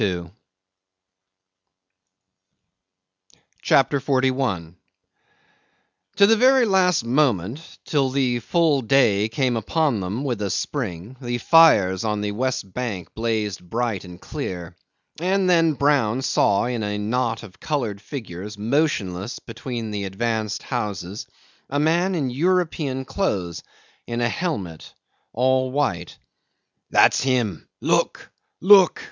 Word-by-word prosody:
CHAPTER 140 - +3
41 130 - -1 1.4
'To 200 - +6
the 225 +2 +5
very 255 +2 +5
last 185 - +2
moment, 125 - 0
till 140 -3 +1
the 130 -2 0
full 155 +2 +2
day 110 -4 +3
came 125 +1 0
upon 125 +2 0
them 100 +8 -3
with 120 -7 -2
a 100 - -1
spring, 105 - -4
the 120 -1 -2
fires 110 - +5
on 105 -2 -1
the 105 0 -2
west 115 -4 -3
bank 110 -8 -5
blazed 110 -3 -2
bright 115 -3 -2
and 90 -1 -11
clear; 90 - -6 0.4
and 185 +2 +1
then 165 -3 +4
Brown 135 -4 +1
saw 100 -3 +2
in 120 -2 -2
a 105 -1 -2
knot 115 +2 -1
of 100 -4 -13
coloured 115 -9 -3
figures 105 - -7
motionless 105 - -1
between 115 -1 -6
the 100 -1 -3
advanced 110 +2 -2
houses 105 -2 -4 0.4
a 145 - -1
man 170 +5 +2
in 140 -6 -1
European 155 -3 0
clothes, 95 - -2 0.5
in 120 0 -3
a 120 0 +1
helmet, 100 - -4 0.4
all 130 +2 +1
white. 130 -11 -2 0.7
"That's - - +4
him; 125 -9 -1
look! - - 0 0.3
look!" 190 -1 +6
120 Hz, 115 wpm, -22 LUFS, 105-145 Hz, 1.4 s, To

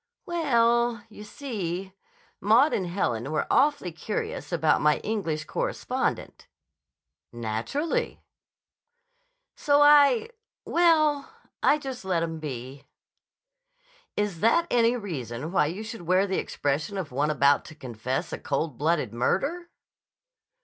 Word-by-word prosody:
"We 345 -1 -3
ell, 235 -4 +2
you 210 -1 -11
see, 195 - -5 0.5
Maud 230 +9 +4
and 185 - -1
Helen 135 - -2
were 155 - 0
awfully 275 -10 +2
curious 185 +5 -5
about 160 -3 +2
my 150 0 +4
English 165 -8 -2
correspondent." - - -3 0.8
"Naturally." 120 - -2 1.4
"So 290 0 +3
I—well, 325 -2 +3 0.3
I 295 - +4
just 265 -5 -7
let 180 -3 0
'em 165 -1 -4
be." 135 -2 -7 1.3
"Is 205 -5 -1
that 230 - +3
any 235 0 +3
reason 150 - -5
why 165 -5 +3
you 185 +8 -5
should 225 -1 -7
wear 185 +3 +2
the 190 -1 -1
expression 150 +8 -2
of 180 -8 -4
one 145 +4 0
about 140 -1 +3
to 155 - -11
confess 125 -1 -4
to - - -3
a - - -17
coldblooded 150 -2 -1
murder?" 285 - -1
190 Hz, 120 wpm, -26 LUFS, -, 1.4 s, Maud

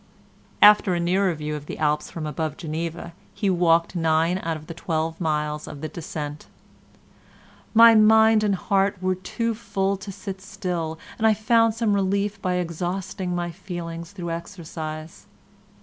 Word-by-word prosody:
After 210 -3 +7
a - - -1
nearer 185 +2 +2
view 150 0 -4
of 150 0 -8
the - - -6
Alps 150 -1 0
from 160 -2 -6
above 155 0 -3
Geneva 165 +1 -5 0.2
he 200 -3 +1
walked 170 0 +2
nine 165 +2 +2
out 165 -3 -3
of 155 - -13
the 165 - -7
twelve 160 0 -3
miles 150 -2 -1
of 140 - -8
the 155 - -3
descent: 150 -2 -6 1.3
"My 230 0 +9
mind 220 0 +6
and 205 -2 +2
heart 195 +1 +1
were 185 0 +1
too 230 +5 -3
full 195 -3 -1
to 195 +1 -8
sit 195 0 -7
still, 175 -4 -4 0.2
and 220 - +4
I 215 - +4
found 225 +1 +3
some 225 -3 +1
relief 200 +1 0
by 180 -1 0
exhausting 180 +2 -3
my 175 -1 -2
feelings 170 -1 -7
through 175 -4 -5
exercise." 160 -3 -7
175 Hz, 160 wpm, -24 LUFS, 160-200 Hz, 1.3 s, My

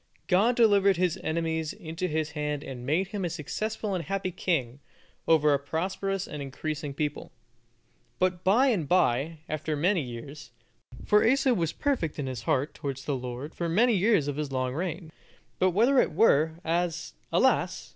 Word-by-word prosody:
God 205 +6 +3
delivered 200 -5 +4
his 180 -2 0
enemies 160 -1 -2
into 165 +3 -4
his 155 -2 -2
hand 150 -1 -3
and 125 -2 -7
made 180 +6 +1
him 200 -1 -4
a 175 - -1
successful 210 +6 -3
and 180 -3 -2
happy 195 -1 -2
king, 145 -8 -1 0.5
over 150 -2 +4
a 140 - +2
prosperous 190 +6 -2
and 150 - -6
increasing 145 +2 -4
people. 150 0 -3 0.9
But 185 -1 0
by 240 +9 +4
and 185 - 0
bye, 155 -2 +1
after 155 0 -2
many 175 +4 +2
years, 135 +3 -8 0.6
for 210 0 +4
Asa 265 +2 +3
was 165 -7 0
perfect 255 - -1
in 145 - -3
his 130 -4 -4
heart 135 +5 0
towards 135 -2 -5
the 145 - -1
Lord 125 +4 -6
for 170 -1 -3
many 230 +8 +3
years 200 -6 +3
of 145 -1 -3
his 150 -2 -3
long 130 -1 -1
reign; 165 0 -4 0.5
but 185 - +4
whether 235 +9 +4
it - - -1
were, 160 -5 +4
as, 170 0 -1 0.2
alas! - - +1
165 Hz, 170 wpm, -28 LUFS, 145-190 Hz, 0.9 s, delivered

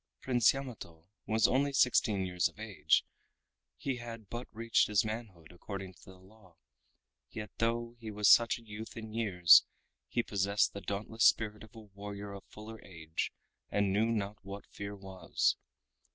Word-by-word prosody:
Prince 120 -3 +4
Yamato 110 -12 -8 0.2
was 110 0 +4
only 140 +2 +2
sixteen 110 -7 +3
years 90 -1 +1
of - - -21
age, 95 -9 +1 0.7
he 135 -2 -2
had 115 -3 -8
but 120 +1 -5
reached 115 +1 +2
his 105 +1 +2
manhood 110 -7 -6
according 95 +1 -7
to 80 - -21
the 95 0 -13
law, 95 -1 -20 0.7
yet 105 -1 -7
though 115 +1 0
he 110 -2 -7
was 105 -1 +1
such 115 -1 +6
a 120 - -15
youth 110 +1 -8
in 110 -1 -7
years 90 -7 +6 0.4
he 120 - 0
possessed 100 0 +1
the 100 - -6
dauntless 105 +4 -1
spirit 105 -1 +3
of 110 - -15
a - - -9
warrior 100 -1 -8
of 100 - -9
fuller 110 +1 -11
age 80 -3 -4 0.4
and 100 -2 +1
knew 110 +3 +3
not 105 -2 -2
what 100 +1 -8
fear 100 0 -7
was. 95 -1 -1
105 Hz, 165 wpm, -32 LUFS, 95-115 Hz, 0.7 s, such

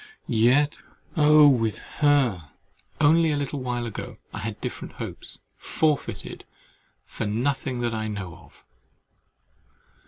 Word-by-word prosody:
Yet, 125 +6 +3 0.4
oh! 150 -1 +7
with 115 -6 +2 0.2
her, 130 - +3 0.5
only 160 +2 +5
a 150 - +1
little 145 0 -3
while 120 -1 -2
ago, 115 - -6 0.2
I - - -5
had - - -5
different - - -6
hopes, - - -4 0.2
forfeited 155 -3 -1 0.6
for 115 - -4
nothing 125 +3 -1
that 120 -1 -1
I 110 -1 -2
know 95 -6 -5
of! - - -20
130 Hz, 120 wpm, -25 LUFS, 115-145 Hz, 0.6 s, oh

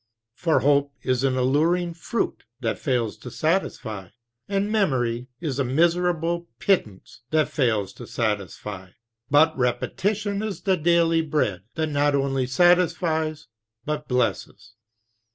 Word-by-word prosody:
For 160 +1 +1
hope 140 +1 +2
is 130 0 0
an 130 -1 +1
alluring 165 +7 +2
fruit 195 +7 -3
that 115 -4 -2
fails 120 -5 0
to 125 - -9
satisfy; 115 - -2 0.4
and 200 +1 0
memory 125 - 0
is 145 -6 -3
a - - +3
miserable 170 +4 +1
pittance 110 - -1
that 155 0 +2
fails 110 -8 0
to - - -8
satisfy; 100 -3 -3 0.4
but 155 +3 +5
repetition 200 - -1
is 215 -2 -4
the 190 -2 +2
daily 165 0 +3
bread 105 - -1
that 160 -1 -1
not 145 0 +2
only 135 -2 0
satisfies 160 0 +2 0.4
but 150 0 -3
blesses. 120 -1 -2
150 Hz, 125 wpm, -24 LUFS, 125-170 Hz, 0.4 s, but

